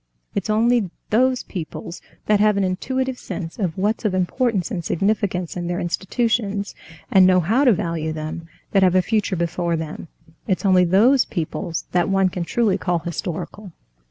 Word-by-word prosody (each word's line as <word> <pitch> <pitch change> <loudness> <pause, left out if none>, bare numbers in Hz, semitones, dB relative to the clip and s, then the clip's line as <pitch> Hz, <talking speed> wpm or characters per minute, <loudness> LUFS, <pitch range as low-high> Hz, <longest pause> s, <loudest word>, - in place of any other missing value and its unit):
It's 200 +1 -3
only 225 -1 +2 0.2
those 255 +3 +2
peoples 170 -1 -7 0.2
that 210 -1 +3
have 210 -1 +3
an 200 - +2
intuitive 260 +8 -2
sense 165 +2 -6
of 180 -5 -2
what's 210 +5 0
of 205 -4 0
importance 190 +1 0
and 180 -5 -3
significance 190 -1 -1
in 175 -1 -3
their 175 0 -2
institutions, 205 +2 -1 0.4
and 190 -1 +7
know 185 -1 +5
how 225 - +2
to 250 - +7
value 165 -6 -1
them, 155 +1 -6 0.2
that 195 - +3
have 185 -1 +4
a 185 - +4
future 210 -2 0
before 170 0 -1
them—it's 160 +4 -6
only 185 -2 +5
those 230 +9 +4
peoples 165 -1 -4
that 175 -1 +1
one 195 -1 +3
can 180 -1 -4
truly 205 -1 +1
call 175 -1 0
historical." 175 +3 -5
190 Hz, 165 wpm, -22 LUFS, 175-215 Hz, 0.4 s, and